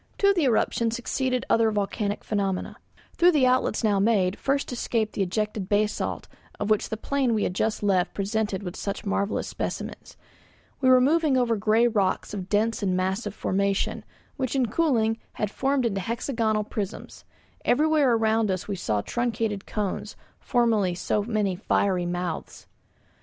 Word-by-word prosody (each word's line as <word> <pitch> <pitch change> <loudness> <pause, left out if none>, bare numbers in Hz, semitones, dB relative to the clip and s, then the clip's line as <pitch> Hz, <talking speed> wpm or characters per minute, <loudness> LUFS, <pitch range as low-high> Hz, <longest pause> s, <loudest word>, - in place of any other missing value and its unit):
To 400 0 +4
the 340 -6 +1
eruption 230 -1 +2
succeeded 255 +2 -1
other 225 -1 +3
volcanic 205 0 -2
phenomena. 195 -3 -2 0.4
Through 350 +1 +4
the 285 -4 +4
outlets 255 -1 +2
now 205 -3 +3
made 195 -3 +2
first 275 0 0
escaped 230 -2 -1
the - - -2
ejected 210 +1 -2
basalt 210 +1 0 0.3
of 210 +1 -1
which 215 - +2
the 220 - -3
plain 260 -1 0
we 210 - 0
had - - -1
just 215 +3 -1
left 190 -3 +1
presented 200 -2 -2
such 200 +1 -4
marvellous 200 +1 -1
specimens. - - -5 0.6
We 260 -2 +3
were 255 0 +7
moving 295 +1 +3
over 240 -2 +2
grey 220 +3 +3
rocks 205 -5 0
of 195 -2 -5
dense 220 +2 +1
and 185 -2 +1
massive 190 +3 -2
formation, 200 +1 -1 0.3
which 260 -2 -2
in 255 -4 +1
cooling 230 -6 +1
had 210 -1 -2
formed 270 +1 0
into 195 -4 -1
hexagonal 225 0 -1
prisms. 205 -2 -6 0.4
Everywhere 300 -2 +3
around 220 -1 +2
us 185 -1 -2
we 200 -2 -3
saw 105 -11 -1
truncated 225 - -2
cones, 205 -3 -3 0.2
formerly 220 -7 +1
so 205 - 0
many 210 -3 -1
fiery 180 -1 0
mouths. 175 -1 -4
215 Hz, 155 wpm, -26 LUFS, 200-245 Hz, 0.6 s, were